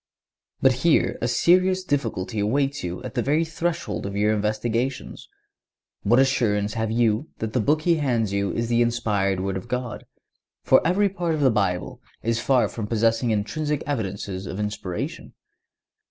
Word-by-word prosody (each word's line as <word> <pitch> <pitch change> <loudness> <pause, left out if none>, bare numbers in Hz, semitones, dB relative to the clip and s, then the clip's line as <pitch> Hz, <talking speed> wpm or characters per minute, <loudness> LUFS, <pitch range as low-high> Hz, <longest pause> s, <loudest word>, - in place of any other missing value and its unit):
But 130 - +7
here 165 0 +2
a 120 - +1
serious 185 +9 +3
difficulty 115 - -2
awaits 135 +7 0
you 90 +4 -5
at 130 -4 -6
the - - 0
very 150 +4 +1
threshold 165 -8 -3
of 100 - -6
your 105 +1 +3
investigations. 115 +5 -2 0.7
What 115 +4 +3
assurance 110 -6 +2
have 110 -1 -1
you 115 +4 +1
that 110 -1 -4
the 125 - +2
book 150 +7 +1
he 170 -1 +3
hands 120 -8 0
you 100 0 0
is 115 0 -2
the 120 0 +2
inspired 105 -5 0
Word 95 0 -2
of 95 - -8
God; 125 -1 -4 0.6
for - - +5
every 190 +5 +3
part 175 -4 -2
of 150 - -3
the 135 -3 +5
Bible 95 -5 -1 0.2
is 115 0 0
far 125 0 +3
from 110 -3 -5
possessing 115 +2 +1
intrinsic 145 +8 -1
evidences 100 -7 -3
of 95 - -5
inspiration? 105 -4 -4
115 Hz, 165 wpm, -24 LUFS, 105-140 Hz, 0.7 s, But